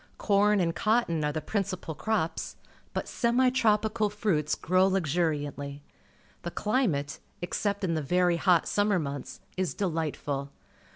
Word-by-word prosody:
Corn_ajid_cotton 200 Hz, -2 st, +2 dB
are 150 Hz, -, +1 dB
the 155 Hz, +1 st, -3 dB
principal 185 Hz, -3 st, -3 dB
crops, 205 Hz, -2 st, -2 dB, 0.4 s
but -, -, -3 dB
semi 250 Hz, +1 st, +2 dB
tropical 220 Hz, -3 st, +2 dB
fruits 190 Hz, -8 st, 0 dB
grow 185 Hz, +2 st, +3 dB
luxuriantly. 145 Hz, -5 st, -1 dB, 0.6 s
The 175 Hz, -, -4 dB
climate, 180 Hz, -, 0 dB, 0.2 s
except 200 Hz, +3 st, -2 dB
in 175 Hz, -3 st, +1 dB
the 160 Hz, -, 0 dB
very 175 Hz, +3 st, +2 dB
hot 170 Hz, -1 st, +3 dB
summer 205 Hz, -1 st, +2 dB
months, 140 Hz, -4 st, -5 dB, 0.2 s
is 185 Hz, -2 st, -1 dB
delightful. 155 Hz, -6 st, -2 dB
180 Hz, 120 wpm, -28 LUFS, 155-210 Hz, 0.6 s, grow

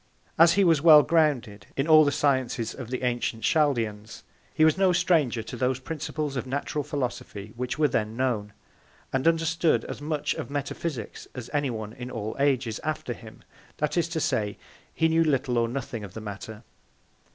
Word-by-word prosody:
As 165 Hz, +1 st, +7 dB
he 200 Hz, -, +3 dB
was 165 Hz, -5 st, +4 dB
well 155 Hz, -2 st, +9 dB
grounded, 135 Hz, -12 st, +1 dB
in 135 Hz, +3 st, 0 dB
all 155 Hz, -1 st, +8 dB
the 145 Hz, -, +2 dB
Sciences 130 Hz, -5 st, 0 dB
of 125 Hz, -4 st, -8 dB
the 130 Hz, 0 st, -4 dB
antient 120 Hz, -2 st, -1 dB
Chaldeans, 115 Hz, -9 st, 0 dB, 0.3 s
he 155 Hz, -, +3 dB
was 160 Hz, -, +4 dB
no 190 Hz, -1 st, +3 dB
Stranger 160 Hz, -10 st, +2 dB
to 120 Hz, -, -7 dB
those 125 Hz, +1 st, 0 dB
Principles 150 Hz, 0 st, -4 dB
of 125 Hz, 0 st, -3 dB
Natural 145 Hz, +2 st, -2 dB
Philosophy, 120 Hz, -7 st, -5 dB
which 125 Hz, +3 st, -3 dB
were 150 Hz, -1 st, +4 dB
then 110 Hz, -3 st, -2 dB
known: 115 Hz, -6 st, -1 dB, 0.6 s
And 135 Hz, +4 st, +1 dB
understood 165 Hz, 0 st, +2 dB
as -, -, -7 dB
much 150 Hz, -1 st, -1 dB
of -, -, -6 dB
Metaphysics 145 Hz, -3 st, -4 dB
as 125 Hz, -2 st, -7 dB
any 145 Hz, -2 st, +1 dB
one 110 Hz, -2 st, -5 dB
in 125 Hz, 0 st, -7 dB
all 110 Hz, -3 st, -5 dB
Ages 130 Hz, -5 st, +1 dB
after 155 Hz, -5 st, -3 dB
him; 110 Hz, -1 st, -13 dB, 0.3 s
that 150 Hz, -, -1 dB
is 170 Hz, -1 st, +1 dB
to 160 Hz, 0 st, -2 dB
say, 105 Hz, -8 st, -1 dB, 0.3 s
he 160 Hz, -, +2 dB
knew 165 Hz, 0 st, +3 dB
little 135 Hz, -5 st, +1 dB
or 115 Hz, -, +1 dB
nothing 120 Hz, -3 st, -5 dB
of 100 Hz, -3 st, -10 dB
the -, -, -5 dB
Matter. 105 Hz, +2 st, -8 dB
135 Hz, 185 wpm, -26 LUFS, 115-155 Hz, 0.6 s, well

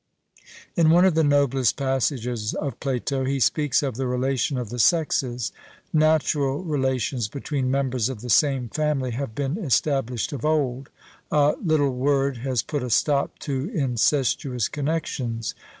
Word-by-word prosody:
In 165 Hz, -3 st, +4 dB
one 175 Hz, +3 st, +6 dB
of 190 Hz, -, +4 dB
the 160 Hz, 0 st, +3 dB
noblest 140 Hz, -4 st, +2 dB
passages 125 Hz, -4 st, -1 dB
of 140 Hz, -6 st, -4 dB
Plato, 135 Hz, 0 st, -2 dB
he 135 Hz, +1 st, -1 dB
speaks 150 Hz, +3 st, +2 dB
of 130 Hz, -5 st, -3 dB
the 130 Hz, -1 st, -1 dB
relation 130 Hz, +1 st, 0 dB
of 125 Hz, -4 st, -4 dB
the 120 Hz, +2 st, -5 dB
sexes. 125 Hz, -, +1 dB, 0.4 s
Natural 155 Hz, -1 st, +2 dB
relations 130 Hz, -, -1 dB
between 135 Hz, +1 st, -3 dB
members 130 Hz, -3 st, 0 dB
of 125 Hz, -5 st, -6 dB
the 125 Hz, -, -7 dB
same 135 Hz, -5 st, +3 dB
family 145 Hz, -1 st, -1 dB
have 120 Hz, -2 st, -4 dB
been 145 Hz, +6 st, -2 dB
established 135 Hz, -4 st, 0 dB
of 135 Hz, -, -6 dB
old; 140 Hz, -4 st, 0 dB, 0.4 s
a 150 Hz, 0 st, +4 dB
'little 150 Hz, -6 st, +2 dB
word' 135 Hz, +1 st, +1 dB
has 125 Hz, -1 st, -1 dB
put 145 Hz, -2 st, -3 dB
a 125 Hz, -, -4 dB
stop 140 Hz, +3 st, +1 dB
to 140 Hz, +1 st, -3 dB
incestuous 130 Hz, -, +1 dB
connexions. 135 Hz, -7 st, -3 dB
135 Hz, 150 wpm, -24 LUFS, 125-145 Hz, 0.4 s, one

